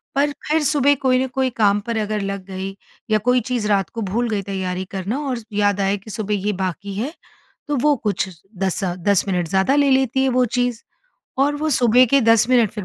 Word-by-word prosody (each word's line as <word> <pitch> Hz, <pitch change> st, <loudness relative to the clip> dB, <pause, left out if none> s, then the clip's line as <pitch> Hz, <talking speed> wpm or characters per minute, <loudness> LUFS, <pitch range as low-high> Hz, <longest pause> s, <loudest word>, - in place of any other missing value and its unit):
पर 285 Hz, +1 st, +2 dB, 0.2 s
फिर 310 Hz, +1 st, +2 dB
सुबह 285 Hz, -1 st, +3 dB
कोई 255 Hz, -1 st, +3 dB
न -, -, -2 dB
कोई 260 Hz, 0 st, -1 dB
काम 205 Hz, -2 st, +3 dB
पर 230 Hz, -1 st, -1 dB
अगर 215 Hz, -1 st, -1 dB
लग 195 Hz, -1 st, -4 dB
गई 190 Hz, 0 st, -6 dB, 0.4 s
या 215 Hz, -, +5 dB
कोई 250 Hz, 0 st, +3 dB
चीज़ 240 Hz, -4 st, -1 dB
रात 200 Hz, -3 st, +1 dB
को 230 Hz, -, -6 dB
भूल 225 Hz, +4 st, -1 dB
गई 210 Hz, -2 st, -1 dB
तैयारी 190 Hz, -1 st, -3 dB
करना 195 Hz, +7 st, -3 dB
और 250 Hz, -2 st, -2 dB
याद 205 Hz, -1 st, +1 dB
आया 195 Hz, +1 st, +1 dB
कि 205 Hz, +2 st, -11 dB
सुबह 210 Hz, 0 st, -3 dB
ये 210 Hz, -, +1 dB
बाकी 190 Hz, +1 st, -4 dB
है, 240 Hz, +10 st, -3 dB, 0.6 s
तो 295 Hz, -, 0 dB
वो 295 Hz, +3 st, +3 dB
कुछ 205 Hz, -5 st, -2 dB, 0.3 s
10 195 Hz, +1 st, -1 dB
अ, 175 Hz, -2 st, -1 dB
10 185 Hz, +2 st, +1 dB
मिनट 180 Hz, -3 st, -1 dB
ज़्यादा 190 Hz, -, +2 dB
ले 285 Hz, -1 st, +3 dB
लेती 265 Hz, 0 st, +2 dB
है, 265 Hz, -, +2 dB
वो 255 Hz, 0 st, +2 dB
चीज़। 245 Hz, 0 st, -1 dB, 0.6 s
और 290 Hz, +1 st, +2 dB
वो 310 Hz, +2 st, -2 dB
सुबह 245 Hz, -1 st, +5 dB
के 275 Hz, +4 st, +3 dB
10 230 Hz, 0 st, +4 dB
मिनट 240 Hz, -5 st, +4 dB
फिर 210 Hz, -3 st, -6 dB
220 Hz, 225 wpm, -20 LUFS, 195-255 Hz, 0.6 s, या